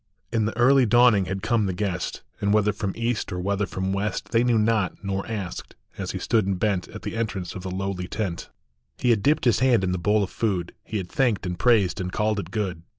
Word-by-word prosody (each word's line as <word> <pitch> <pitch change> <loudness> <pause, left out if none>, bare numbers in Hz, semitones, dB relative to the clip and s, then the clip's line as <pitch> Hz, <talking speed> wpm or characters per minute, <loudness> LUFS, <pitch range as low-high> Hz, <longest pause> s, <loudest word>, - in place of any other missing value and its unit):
In 110 -2 +2
the 110 - -3
early 130 +1 +5
dawning 120 -3 +5
had 95 +2 -4
come 115 -3 +2
the 95 - -1
guest, 95 -3 -3 0.2
And 100 - +1
whether 105 0 +3
from 100 -3 -3
east 115 -2 -2
or 90 - -3
whether 100 +2 -1
from 95 0 -2
west 100 0 -2
They 115 +1 +3
knew 120 -2 +3
not, 105 -3 +1
nor 95 -1 -2
asked, 100 -6 -5 0.2
as - - -5
he - - -3
stood 110 -4 +1
and 95 -2 0
bent 95 -2 0
At - - -10
the - - -4
entrance 110 -5 -3
of 95 - -7
the 95 - -5
lowly 95 -1 -3
tent: 95 -6 -4 0.5
He 125 - +2
had 110 -3 +2
dipped 145 +6 +2
his 120 - +4
hand 125 -6 +3
in 90 - 0
the 90 - -1
bowl 105 +3 +2
of 95 - -5
food, 95 -6 -1
He 110 - -4
had 90 -3 -4
thanked 120 -8 +1
and 90 -1 -4
praised 105 -6 +3
and 90 0 -3
called 105 +1 0
it - - -4
good; - - -14
212 105 -2 -1
WHAT - - -2
THE - - -7
ANGEL - - -20
SAW. - - -43
105 Hz, 265 wpm, -25 LUFS, 95-115 Hz, 0.5 s, early